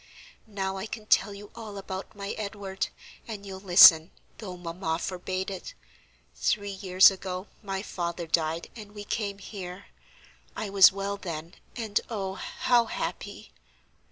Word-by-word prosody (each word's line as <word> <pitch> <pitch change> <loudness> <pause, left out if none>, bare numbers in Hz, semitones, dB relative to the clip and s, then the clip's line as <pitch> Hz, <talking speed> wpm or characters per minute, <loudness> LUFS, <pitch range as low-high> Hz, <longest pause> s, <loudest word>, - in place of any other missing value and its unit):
Now 195 -2 -3
I 190 +3 -4
can 220 -1 -7
tell 215 - +4
you 205 0 -11
all 215 -3 -8
about 190 +1 -6
my 200 0 -5
Edward, 200 -2 -4 0.4
and 210 -3 -7
you'll 190 -1 -7
listen, 175 -3 +8 0.3
though 185 -5 -7
mamma 170 -1 -3
forbade 185 +2 -3
it. 190 - -7 0.6
Three 205 -1 0
years 190 -1 +6
ago 185 0 -5 0.2
my 195 -2 -4
father 170 -3 -4
died, 160 0 0
and 210 -3 -10
we 205 - -6
came 205 -1 -3
here. 190 -1 -8 0.7
I 210 -2 -4
was 195 -1 +8
well 200 +1 -3
then, 170 -3 -6 0.2
and 220 -4 -1
oh, 195 -4 -3
how 235 +5 +1
happy!" 65 - -5
195 Hz, 145 wpm, -28 LUFS, 180-205 Hz, 0.7 s, listen